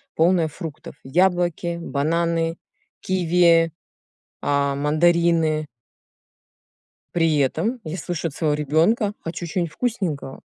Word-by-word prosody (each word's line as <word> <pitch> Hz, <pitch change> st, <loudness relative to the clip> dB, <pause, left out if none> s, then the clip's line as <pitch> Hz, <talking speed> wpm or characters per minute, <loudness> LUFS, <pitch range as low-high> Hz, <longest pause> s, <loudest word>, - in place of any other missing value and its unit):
полная 170 Hz, 0 st, +3 dB
фруктов: 155 Hz, -2 st, -8 dB
яблоки, 175 Hz, +2 st, +1 dB
бананы, 165 Hz, +2 st, 0 dB, 0.4 s
киви, 170 Hz, -2 st, +3 dB, 0.7 s
а, 140 Hz, -1 st, +1 dB
мандарины. 160 Hz, +1 st, +2 dB, 1.5 s
При 165 Hz, -3 st, +2 dB
этом 170 Hz, -, 0 dB
я 155 Hz, +1 st, -5 dB
слышу 170 Hz, 0 st, -3 dB
от -, -, -14 dB
своего 150 Hz, -2 st, 0 dB
ребенка: 165 Hz, -, +2 dB
"Хочу 170 Hz, +1 st, -5 dB
чё-нибудь 170 Hz, 0 st, -2 dB
вкусненького". 180 Hz, -, -3 dB
165 Hz, 95 wpm, -22 LUFS, 155-175 Hz, 1.5 s, полная